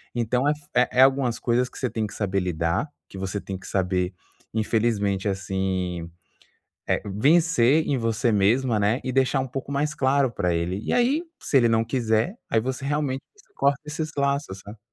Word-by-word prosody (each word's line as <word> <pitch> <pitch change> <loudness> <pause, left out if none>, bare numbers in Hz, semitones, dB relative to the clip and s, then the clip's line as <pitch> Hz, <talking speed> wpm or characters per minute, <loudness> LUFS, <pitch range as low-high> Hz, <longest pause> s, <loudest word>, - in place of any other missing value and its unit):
Então 125 +4 +1
é - - +4
f 150 -1 -6
é 125 - +4
é - - +9
algumas 135 -3 +2
coisas 125 +1 +1
que - - -14
você 130 - -1
tem 110 -1 -2
que - - -11
saber 100 -2 -1
lidar, 85 - -1 0.2
que 95 - -10
você 95 +1 -3
tem 95 -1 -5
que - - -14
saber 90 -1 0 0.4
infelizmente 105 -3 0
assim, 95 -3 -2 1.0
vencer 150 - +3
em 140 -3 +1
você 115 +1 +1
mesma, 110 +3 +2
né, 110 +7 +1
e 130 - -2
deixar 135 +1 +2
um 130 - -2
pouco 135 +2 -6
mais 150 +2 0
claro 135 -1 +2
para 90 -4 0
ele 90 +4 -1
e - - -2
aí 265 +7 +2 0.2
se 140 - 0
ele 120 -2 +4
não 115 0 +2
quiser, 115 - 0 0.2
aí 110 - +3
você 130 +3 -4
realmente 140 -2 -1 0.3
corta 140 0 +2
esses 155 +1 -4
laços, 140 -9 -1
sabe. 105 +3 -11
115 Hz, 185 wpm, -24 LUFS, 100-140 Hz, 1.0 s, é